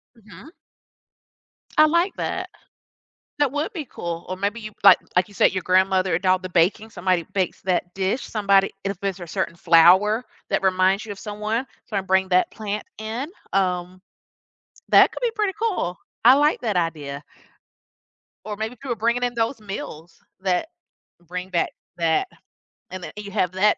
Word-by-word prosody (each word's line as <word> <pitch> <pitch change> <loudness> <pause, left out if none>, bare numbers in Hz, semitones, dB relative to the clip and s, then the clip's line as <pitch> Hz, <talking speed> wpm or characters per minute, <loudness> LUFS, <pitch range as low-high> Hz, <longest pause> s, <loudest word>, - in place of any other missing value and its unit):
Mhm. 215 - -15 1.2
I 310 - +8
like 340 +5 +2
that. - - -3 0.9
That 290 -3 +3
would 305 +9 -2
be 310 -6 -4
cool. 170 -6 -6
Or 185 - -2
maybe 200 +4 -2
you, 215 -1 -7
like - - +9 0.2
like, 180 0 +3
you 205 - -17
said, - - +4
your 185 - -2
grandmother 185 0 +3
and 180 - -3
all 185 0 +5
the 185 0 -8
baking, 185 +5 +2
somebody 180 -4 0
bakes 190 -2 -1
that 180 -1 -1
dish, 195 +6 0
somebody 200 -2 +2
if 195 -2 -3
there's 195 -1 -3
a 175 - -7
certain 165 - -2
flower 180 +7 +5 0.3
that - - +1
reminds 190 +2 +2
you 215 - -7
of 200 - -8
someone, 215 +4 -3 0.2
so 210 - -3
I 195 - +1
bring 190 0 +2
that 180 0 +3
plant 210 -1 -4 0.2
in, 225 +6 -4 0.3
um 180 -1 0 0.9
That - - +6
could - - -7
be 480 - +2
pretty 420 -3 +1
cool. 375 - -1 0.3
I 250 +3 +9
like 295 +2 +3
that 215 -6 -1
idea. 150 -4 -2 1.2
Or 210 - -4
maybe 220 +2 -3
if 245 - -20
you 275 - -6
were 240 - 0
bringing 235 +3 0
in 245 - 0
those 230 +2 -1
meals 180 -5 -8 0.2
that 185 - 0 0.5
bring 180 +2 -6
back 175 -3 +1 0.3
that 165 - +1 0.6
and 185 -1 -7
then - - -6
you 210 -1 -8
have 185 -3 0
that 205 +3 +3
195 Hz, 175 wpm, -23 LUFS, 180-225 Hz, 1.2 s, like